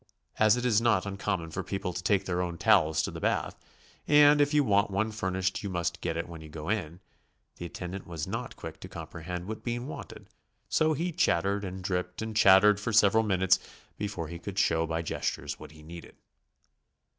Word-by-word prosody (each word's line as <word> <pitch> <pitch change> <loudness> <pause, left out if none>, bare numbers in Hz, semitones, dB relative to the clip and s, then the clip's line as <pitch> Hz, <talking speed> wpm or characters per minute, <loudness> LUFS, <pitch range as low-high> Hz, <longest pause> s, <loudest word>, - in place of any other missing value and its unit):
As 110 +2 +5
it 125 - -2
is 115 -3 +3
not 105 -5 +2
uncommon 100 -4 -3
for - - -3
people 95 -2 -4
to 90 - -4
take 95 +1 +1
their 90 -1 -1
own 85 -2 -3
towels 75 -2 +3
to - - -2
the - - -7
bath, - - 0 0.5
and 145 0 +6
if 145 0 +3
you 150 -1 +4
want 105 -3 +2
one 100 +3 -1
fur 105 -3 -3
nished 95 0 -1
you 100 - -4
must 90 -2 -2
get 80 - -2
it 85 - -3
when 85 -2 -9
you 80 - -11
go 75 +1 -7
in, 90 -6 -2 0.6
the 85 - -6
attendant 90 +2 -7
was 80 -3 -4
not - - -5
quick - - -9
to - - -9
comprehend 90 +2 -7
what 110 +2 -6
Bean 120 0 -3
wanted, 145 - -9 0.4
so 155 0 +2
he 170 +4 -2
chattered 100 - +1
and 95 -1 -6
dripped 90 +1 -2
and 110 -1 -5
chattered 100 0 +6
for 110 +3 -3
several 110 0 +5
minutes 95 -2 +3 0.4
before 100 -6 -4
he 85 +1 -7
could 95 +2 -7
show 80 -3 +2
by 80 +1 -2
gestures - - -3
what - - -10
he 75 +1 -15
needed. 85 +2 -11
95 Hz, 205 wpm, -29 LUFS, 85-110 Hz, 0.6 s, and